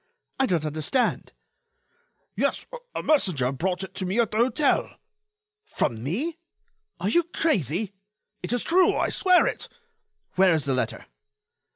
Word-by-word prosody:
I 265 - +3
don't 165 -7 0
understand." 155 - -1 1.0
"Yes, - - 0 0.3
a - - -3
messenger 175 - +2
brought 180 +6 -2
it 190 - -8
to 190 - -4
me 195 +6 0
at 230 -3 +2
the 215 - -2
hotel." 260 +5 +1 0.7
"From 120 - -2
me? 270 - -3 0.6
Are 185 - -2
you 345 - +4
crazy?" 215 - -1 0.5
"It - - -4
is 245 -1 +1
true—I 365 +2 +3
swear 365 -2 +4
it." - - -3 0.7
"Where 185 -2 +5
is 155 - -1
the 135 - +1
letter?" 125 -3 -2
195 Hz, 140 wpm, -25 LUFS, -, 1.0 s, Where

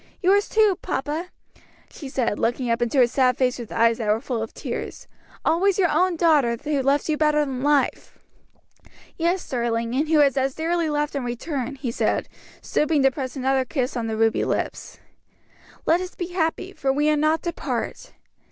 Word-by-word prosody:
"Yours 400 +2 +3
too, 430 -4 +3
papa," 300 +6 -3 0.6
she 280 - -9
said, 245 -5 -1
looking 240 +1 0
up 230 +1 0
into 240 +3 +1
his 240 -1 +3
sad 255 -2 +2
face 255 -1 +1
with 235 - -8
eyes 230 0 +2
that 220 - -3
were 215 +1 +3
full 235 -1 -3
of 225 - -5
tears, - - -6 0.4
"always 375 +3 +2
your 365 -3 +3
own 365 -1 +2
daughter 300 -8 +3
who 290 -2 0
loves 275 +2 +1
you 310 - +1
better 300 -1 +2
than 260 -2 -4
life." 290 -1 0 1.0
"Yes, 345 +2 -1
darling, 235 -2 -1
and 295 +4 0
who 315 -2 +4
is 280 -2 +4
as 270 0 0
dearly 330 0 0
loved 295 0 -1
in 275 - -2
return," 255 +2 -4
he 260 -3 -4
said, - - 0 0.4
stooping 300 -2 +1
to 270 - +5
press 260 -1 -5
another 265 0 +1
kiss 260 -1 -2
on 235 -2 -2
the 220 -1 -3
ruby 225 0 +2
lips. - - -3 0.9
"Let 340 +3 +3
us 365 0 -7
be 350 -1 -4
happy, 355 +2 -2
for 270 -6 0
we 295 +2 +1
are - - +3
not 310 +2 +1
to 345 -1 -2
part." - - -4
280 Hz, 190 wpm, -23 LUFS, 250-320 Hz, 1.0 s, to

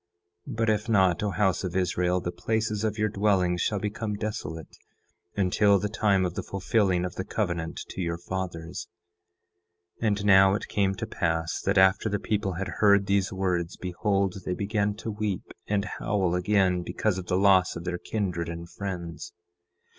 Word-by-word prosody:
10:7 - - -5
But 115 0 +1
if 105 +2 -1
not, 95 -5 +3
O 105 - 0
house 95 -2 +1
of 90 -2 -4
Israel, 90 0 +1
the 90 0 -3
places 110 +3 -1
of 110 0 -1
your 105 0 +2
dwellings 95 -4 +1
shall 105 - +1
become 105 +1 -3
desolate 80 -7 -5 0.6
until 100 +1 +3
the 105 +2 -2
time 100 -3 +2
of 90 - -2
the - - -3
fulfilling 95 -2 +1
of 90 - -4
the 95 - -4
covenant 85 -6 -2
to - - -5
your 85 -1 -2
fathers. 85 -2 -5 1.1
10:8 115 - +1
And 100 -1 0
now 95 -1 +6
it - - -4
came 95 -1 +1
to 95 - -4
pass 85 -1 -1
that 100 +1 0
after 95 +3 +4
the 105 - 0
people 100 -2 -1
had 95 +3 -4
heard 100 -1 +5
these 100 -1 +1
words, 90 -3 -1
behold, 95 +1 -1
they 90 - -2
began 105 0 0
to 110 +1 -5
weep 105 -3 -2 0.2
and 100 -1 0
howl 95 -4 -1
again 90 0 +2
because 95 +2 -1
of 90 - -8
the 90 - +1
loss 95 -2 +4
of 85 - -6
their 90 0 -3
kindred 90 -6 -2
and 85 0 -6
friends. 85 -4 -6
95 Hz, 180 wpm, -27 LUFS, 90-105 Hz, 1.1 s, now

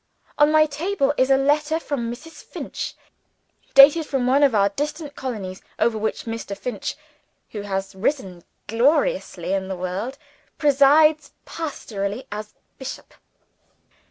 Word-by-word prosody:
On 295 +1 +6
my 310 0 +6
table 300 0 0
is 260 -1 +2
a 270 - +5
letter 300 +3 +1
from 245 -8 -3
Mrs. 320 +7 -10
Finch, - - -6 0.8
dated 285 +4 +8
from 265 -3 -1
one 265 +3 +3
of 275 -5 +4
our 200 -1 +4
distant 295 - -4
colonies 200 -7 -5 0.2
over 235 - +2
which 220 0 -3
Mr. 225 -3 -5
Finch 240 -3 -4 0.6
(who 210 - -5
has 195 -1 -3
risen 190 - -2 0.2
gloriously 280 - +1
in 190 -1 -1
the 190 - -3
world) 190 +9 -4 0.4
presides 300 +2 +4
pastorally 225 -8 -4
as 210 0 -7 0.2
bishop. 265 0 -8
265 Hz, 130 wpm, -23 LUFS, 205-295 Hz, 0.8 s, dated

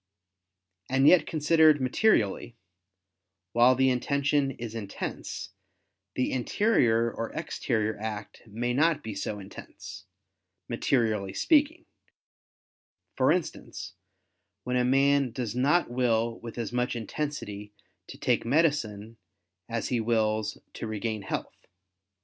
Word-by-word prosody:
And 135 +2 +3
yet 180 - +6
considered 155 -1 +4
materially, 125 - +1 1.0
while 120 +4 +5
the 130 +1 +3
intention 140 +2 +1
is 120 -4 -7
intense, 105 -4 -6 0.6
the 130 - 0
interior 120 - +2
or 115 - -4
exterior 110 -2 -2
act 105 -1 -6
may 115 +3 -3
be - - -1
not 155 +2 +2
so 105 +1 -3
intense, 95 -1 -10 0.6
materially 110 -7 0
speaking: 315 +2 +2 1.3
for - - +3
instance, - - -3 0.7
when 125 - -2
a 125 - +3
man 135 +1 +3
does 115 -2 -4
not 140 +3 +2
will 115 -2 0
with 115 0 -9
as 120 0 -4
much 125 0 0
intensity 110 -4 -5 0.4
to - - -10
take - - +1
medicine 115 -7 0 0.5
as 115 -1 -2
he 125 - +1
wills 110 -2 0 0.2
to - - -6
regain 110 0 -3
health. - - -6
120 Hz, 115 wpm, -28 LUFS, 110-140 Hz, 1.3 s, yet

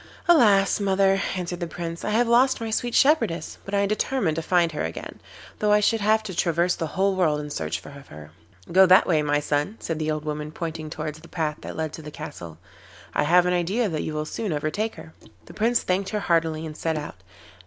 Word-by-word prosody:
'Alas! 215 - +5
mother,' 195 -1 +2
answered 175 -1 -4
the 175 - -3
Prince, 170 0 -6
'I - - -2
have 230 +3 +2
lost 255 +3 +4
my 225 -1 -4
sweet 240 +2 -1
shepherdess, 230 - +2
but 195 - -4
I 200 - +3
am 200 - +1
determined 215 -4 0
to - - 0
find 170 0 +2
her 150 - -4
again, 80 - -6 0.4
though 210 0 +2
I 210 - +6
should 220 +1 +1
have 220 +1 +3
to 200 -3 -6
traverse 170 +1 +1
the 165 - -3
whole 195 0 +2
world 160 -5 +2
in 150 0 -6
search 80 - -4
of 140 -1 -12
her.' 75 0 -12 0.4
'Go 190 +2 +6
that 185 +1 +6
way, 160 -4 +2
my 145 0 +1
son,' 150 +8 -1
said 165 -2 -4
the 155 0 -1
old 155 0 -2
woman, 150 0 -4
pointing 160 -1 -5
towards 155 -1 -5
the 165 - -15
path 155 -3 -2
that - - -7
led 160 -1 -3
to - - -8
the 150 - -8
castle. 85 - -9 0.6
'I - - +1
have 175 +3 +5
an 180 - +1
idea 195 +6 0
that 155 -3 -2
you 155 - -4
will 150 0 -2
soon 205 +5 -4
overtake 155 +9 -2
her.' 160 - -12 0.3
The - - -13
Prince 230 +2 +1
thanked 190 +1 -1
her 210 - -2
heartily 165 -2 0
and 155 -1 -7
set 160 0 -2
out. 150 -10 -6
170 Hz, 230 wpm, -24 LUFS, 155-205 Hz, 0.6 s, I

